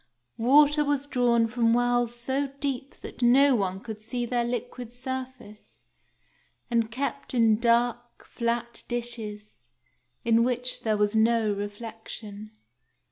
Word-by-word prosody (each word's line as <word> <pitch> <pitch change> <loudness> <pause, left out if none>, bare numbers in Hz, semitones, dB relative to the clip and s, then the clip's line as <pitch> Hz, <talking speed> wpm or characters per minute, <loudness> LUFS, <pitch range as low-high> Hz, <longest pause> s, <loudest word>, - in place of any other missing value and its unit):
Water 295 +5 +5
was 285 -1 0
drawn 240 -4 +2
from 230 0 +1
wells 245 -1 +1
so 265 +4 -1
deep 275 -2 -3
that - - -10
no 265 +3 +6
one 190 -5 -1
could 220 0 -8
see 240 +2 -2
their 240 0 0
liquid 245 0 -5
surface, 255 -4 -7 0.9
and 230 -2 +1
kept 275 +2 -3
in 225 -2 +4
dark, 240 0 0
flat 235 0 -3
dishes, 220 - -5 0.6
in 230 0 +4
which 250 +1 -1
there 215 -2 0
was 210 +1 +1
no 220 -1 +3
reflection. 210 0 -7
235 Hz, 125 wpm, -27 LUFS, 220-250 Hz, 0.9 s, no